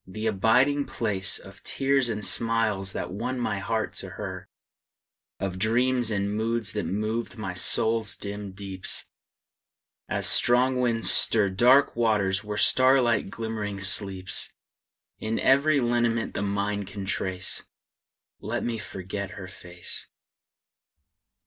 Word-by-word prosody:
the 110 Hz, +4 st, -6 dB
abiding 125 Hz, +8 st, +2 dB
place 105 Hz, -8 st, -1 dB
Of -, -, -13 dB
tears 135 Hz, -2 st, +1 dB
and 105 Hz, -2 st, +1 dB
smiles 110 Hz, -4 st, +1 dB
that -, -, -5 dB
won 125 Hz, +6 st, -4 dB
my 105 Hz, -4 st, -2 dB
heart 110 Hz, +2 st, -2 dB
to -, -, -1 dB
her; -, -, -8 dB, 0.9 s
Of 95 Hz, -1 st, -4 dB
dreams 120 Hz, +2 st, +2 dB
and 100 Hz, -1 st, -1 dB
moods 115 Hz, +1 st, 0 dB
that 105 Hz, -, -3 dB
moved 110 Hz, +4 st, -3 dB
my 100 Hz, -4 st, -5 dB
soul's 110 Hz, +4 st, +3 dB
dim 100 Hz, -1 st, -6 dB
deeps, 95 Hz, -1 st, -2 dB, 1.0 s
As -, -, -1 dB
strong 125 Hz, +1 st, +4 dB
winds 115 Hz, -2 st, +4 dB
stir 105 Hz, -3 st, +5 dB
Dark 125 Hz, +8 st, +4 dB
waters 105 Hz, -4 st, +1 dB
where 105 Hz, -1 st, -5 dB
the -, -, +3 dB
starlight 130 Hz, -5 st, +3 dB
glimmering 110 Hz, -2 st, -5 dB
sleeps. 95 Hz, -1 st, -1 dB, 0.7 s
In 110 Hz, +1 st, -3 dB
every 140 Hz, +2 st, +3 dB
lineament 120 Hz, -2 st, 0 dB
the -, -, -3 dB
mind 100 Hz, 0 st, -2 dB
can 100 Hz, 0 st, -7 dB
trace, 95 Hz, -1 st, -2 dB, 0.8 s
Let -, -, -4 dB
me 115 Hz, -2 st, -3 dB
forget 95 Hz, -1 st, -6 dB
her 95 Hz, -, -8 dB
face! 90 Hz, -1 st, -5 dB
110 Hz, 130 wpm, -26 LUFS, 100-120 Hz, 1.0 s, stir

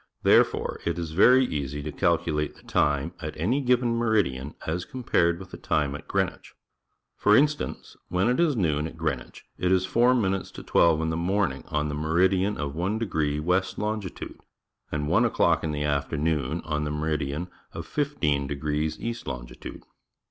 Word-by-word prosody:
Therefore -, -, +3 dB
it -, -, -1 dB
is 85 Hz, -2 st, -4 dB
very 125 Hz, +10 st, +6 dB
easy 75 Hz, -, -3 dB
to 75 Hz, -, -4 dB
calculate 80 Hz, -4 st, 0 dB
the -, -, -19 dB
time 75 Hz, +3 st, +1 dB
at 75 Hz, 0 st, -5 dB
any 115 Hz, -, +1 dB
given 125 Hz, -2 st, +2 dB
meridian 100 Hz, -, 0 dB
as 85 Hz, +3 st, -2 dB
compared 85 Hz, -10 st, +1 dB
with 95 Hz, +1 st, -11 dB
the -, -, -8 dB
time 70 Hz, -2 st, 0 dB
at 70 Hz, -, -8 dB
Greenwich. -, -, -2 dB, 0.6 s
For 105 Hz, +1 st, +5 dB
instance, 150 Hz, +1 st, 0 dB
when 90 Hz, +4 st, +1 dB
it 125 Hz, +4 st, +2 dB
is 165 Hz, -5 st, +3 dB
noon 80 Hz, -7 st, 0 dB
at 80 Hz, -, -11 dB
Greenwich, 80 Hz, -1 st, -4 dB
it 90 Hz, 0 st, +1 dB
is 95 Hz, 0 st, +3 dB
four 120 Hz, +4 st, +3 dB
minutes 95 Hz, -5 st, 0 dB
to -, -, -9 dB
twelve 80 Hz, -2 st, +3 dB
in 80 Hz, 0 st, -1 dB
the 80 Hz, -, -2 dB
morning 90 Hz, -4 st, 0 dB
on 75 Hz, 0 st, -1 dB
the 75 Hz, -, -3 dB
meridian 90 Hz, +6 st, +2 dB
of 70 Hz, -2 st, -3 dB
1° 85 Hz, -5 st, -1 dB
west 90 Hz, +4 st, 0 dB
longitude, 105 Hz, -4 st, -4 dB, 0.5 s
and 75 Hz, -1 st, -2 dB
one -, -, +3 dB
o'clock -, -, +2 dB
in 80 Hz, -, -1 dB
the 75 Hz, 0 st, -2 dB
afternoon 75 Hz, 0 st, -1 dB
on 75 Hz, -1 st, -1 dB
the 75 Hz, -, -2 dB
meridian 75 Hz, +1 st, -2 dB, 0.2 s
of -, -, -7 dB
15° 75 Hz, -, -1 dB
east 115 Hz, 0 st, -4 dB
longi -, -, -7 dB
tude. -, -, -9 dB
80 Hz, 170 wpm, -26 LUFS, 75-100 Hz, 0.6 s, very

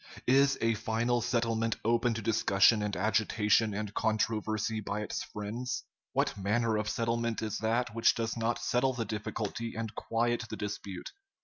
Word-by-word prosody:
Is 135 Hz, +2 st, +4 dB
a 115 Hz, 0 st, +3 dB
final 115 Hz, +2 st, 0 dB
settlement 115 Hz, -1 st, 0 dB
open 115 Hz, 0 st, +2 dB
to 115 Hz, -, -4 dB
discussion 105 Hz, 0 st, +4 dB
and 105 Hz, -1 st, -2 dB
agitation 110 Hz, +1 st, +2 dB
and 105 Hz, -1 st, -4 dB
controversy 110 Hz, 0 st, 0 dB
by 105 Hz, 0 st, -3 dB
its 105 Hz, -, -3 dB
friends? 110 Hz, +5 st, -4 dB, 0.3 s
What -, -, +1 dB
manner 110 Hz, +3 st, +1 dB
of 105 Hz, -1 st, -1 dB
settlement 115 Hz, 0 st, -1 dB
is 110 Hz, -, -2 dB
that 115 Hz, +1 st, 0 dB
which 115 Hz, 0 st, +4 dB
does 115 Hz, -1 st, -2 dB
not 115 Hz, +1 st, 0 dB
settle 130 Hz, +2 st, +1 dB
the 120 Hz, -2 st, -2 dB
difficulty 110 Hz, +1 st, -4 dB
and 115 Hz, -1 st, -4 dB
quiet 120 Hz, 0 st, 0 dB
the -, -, -5 dB
dispute? 100 Hz, -3 st, -5 dB
115 Hz, 155 wpm, -31 LUFS, 105-115 Hz, 0.3 s, Is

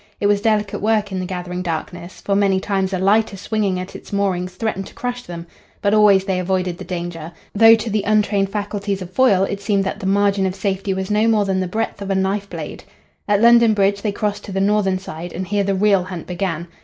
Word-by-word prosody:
It -, -, -2 dB
was 205 Hz, 0 st, +3 dB
delicate 210 Hz, -2 st, 0 dB
work 210 Hz, -1 st, +1 dB
in 190 Hz, -, -2 dB
the 185 Hz, -, -3 dB
gathering 180 Hz, -1 st, -4 dB
darkness, 175 Hz, +1 st, -5 dB
for 200 Hz, -, 0 dB
many 195 Hz, -1 st, +2 dB
times 195 Hz, -1 st, -1 dB
a 190 Hz, -, -1 dB
lighter 200 Hz, +2 st, +2 dB
swinging 200 Hz, -2 st, -1 dB
at 185 Hz, +1 st, -7 dB
its -, -, -11 dB
moorings 185 Hz, -3 st, -1 dB
threatened 195 Hz, -1 st, -3 dB
to -, -, -15 dB
crush 245 Hz, 0 st, -4 dB
them; 170 Hz, -6 st, -8 dB, 0.3 s
but 200 Hz, 0 st, +1 dB
always 205 Hz, -3 st, +5 dB
they 190 Hz, -2 st, 0 dB
avoided 185 Hz, -1 st, -1 dB
the -, -, -6 dB
danger, 170 Hz, -2 st, -5 dB, 0.2 s
though 225 Hz, +2 st, +7 dB
to 225 Hz, +1 st, -5 dB
the 215 Hz, -1 st, 0 dB
untrained 205 Hz, -1 st, +1 dB
faculties 205 Hz, -1 st, -3 dB
of 180 Hz, -, -11 dB
Foyle 205 Hz, -7 st, +4 dB
it 200 Hz, 0 st, -3 dB
seemed 200 Hz, -1 st, +1 dB
that 195 Hz, +2 st, -4 dB
the 190 Hz, -, -4 dB
margin 200 Hz, 0 st, +2 dB
of 185 Hz, -, -4 dB
safety 195 Hz, 0 st, -2 dB
was 190 Hz, +1 st, -3 dB
no 210 Hz, +2 st, +3 dB
more 215 Hz, -2 st, +3 dB
than 190 Hz, -1 st, 0 dB
the 185 Hz, -, -1 dB
breadth 215 Hz, +2 st, -3 dB
of 200 Hz, -, -5 dB
a 195 Hz, -, +1 dB
knife 195 Hz, +1 st, -1 dB
blade. -, -, -7 dB, 0.4 s
At 205 Hz, +1 st, +2 dB
London 235 Hz, -2 st, +6 dB
Bridge 200 Hz, 0 st, +1 dB
they 210 Hz, -, -1 dB
crossed 205 Hz, 0 st, -3 dB
to -, -, -8 dB
the 195 Hz, -, -1 dB
northern 195 Hz, -1 st, +2 dB
side, 175 Hz, -2 st, -8 dB
and 185 Hz, +1 st, -4 dB
here 205 Hz, +1 st, 0 dB
the 195 Hz, 0 st, 0 dB
real 195 Hz, -2 st, +3 dB
hunt 180 Hz, -3 st, -7 dB
began. 175 Hz, -2 st, -3 dB
195 Hz, 235 wpm, -20 LUFS, 185-210 Hz, 0.4 s, though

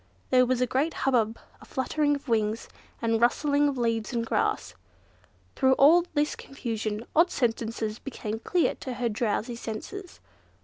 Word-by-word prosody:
There 255 Hz, -1 st, +5 dB
was 255 Hz, 0 st, +1 dB
a -, -, +4 dB
great 280 Hz, +6 st, 0 dB
hubbub, 230 Hz, -4 st, +2 dB, 0.2 s
a -, -, -12 dB
fluttering 290 Hz, +3 st, 0 dB
of 280 Hz, -, -9 dB
wings, 220 Hz, -1 st, 0 dB, 0.4 s
and 225 Hz, 0 st, +1 dB
rustling 285 Hz, +4 st, +3 dB
of 280 Hz, -2 st, -1 dB
leaves 230 Hz, -2 st, 0 dB
and 230 Hz, -1 st, 0 dB
grass. -, -, 0 dB, 0.8 s
Through 265 Hz, -1 st, +4 dB
all 325 Hz, +6 st, +6 dB
this 295 Hz, +1 st, +1 dB
confusion, 225 Hz, -4 st, -4 dB
odd 335 Hz, +3 st, +5 dB
sentences 225 Hz, -4 st, -1 dB
became 225 Hz, -5 st, -5 dB
clear 350 Hz, +8 st, +1 dB
to 260 Hz, -, -6 dB
her 240 Hz, -1 st, -1 dB
drowsy 225 Hz, +2 st, -1 dB
senses. 290 Hz, -, -7 dB
245 Hz, 150 wpm, -27 LUFS, 225-285 Hz, 0.8 s, all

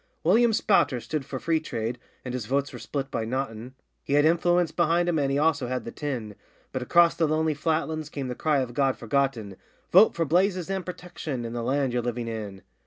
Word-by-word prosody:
William 225 Hz, +8 st, +4 dB
Spouter 195 Hz, -, +2 dB
stood 135 Hz, +5 st, -4 dB
for 130 Hz, -, -5 dB
Freetrade 125 Hz, -7 st, -2 dB, 0.3 s
(and 125 Hz, -, -4 dB
his 125 Hz, -4 st, -4 dB
votes 140 Hz, +2 st, 0 dB
were -, -, -7 dB
split 135 Hz, -1 st, -4 dB
by 115 Hz, -, -1 dB
Nottin), 125 Hz, 0 st, -4 dB, 0.3 s
He -, -, -3 dB
had 145 Hz, +1 st, +5 dB
influence 175 Hz, +1 st, +3 dB
behind 170 Hz, +1 st, +2 dB
him 165 Hz, -3 st, +1 dB
and 140 Hz, -1 st, +1 dB
he 140 Hz, -, +1 dB
also 150 Hz, -3 st, +2 dB
had 125 Hz, +1 st, -3 dB
the 115 Hz, -, -5 dB
tin, 125 Hz, -8 st, -4 dB, 0.4 s
But 130 Hz, -, -3 dB
across 170 Hz, +7 st, +5 dB
the 165 Hz, -, +1 dB
lonely 155 Hz, 0 st, +1 dB
flatlands 155 Hz, 0 st, -1 dB
came 140 Hz, -3 st, -4 dB
the 125 Hz, -, -3 dB
cry 145 Hz, +2 st, +1 dB
of 125 Hz, -2 st, -4 dB
God 135 Hz, 0 st, +1 dB
Forgotten, 115 Hz, -5 st, -1 dB, 0.3 s
'Vote 195 Hz, +5 st, +7 dB
for 165 Hz, -, 0 dB
Blazes 185 Hz, +3 st, +1 dB
and 190 Hz, -1 st, -2 dB
Protection, 170 Hz, -8 st, -6 dB
and 115 Hz, +1 st, -5 dB
the 120 Hz, -, -2 dB
land 135 Hz, +1 st, 0 dB
you're 125 Hz, -, +1 dB
living 120 Hz, 0 st, -3 dB
in! 105 Hz, -4 st, -6 dB
140 Hz, 210 wpm, -26 LUFS, 125-165 Hz, 0.4 s, Vote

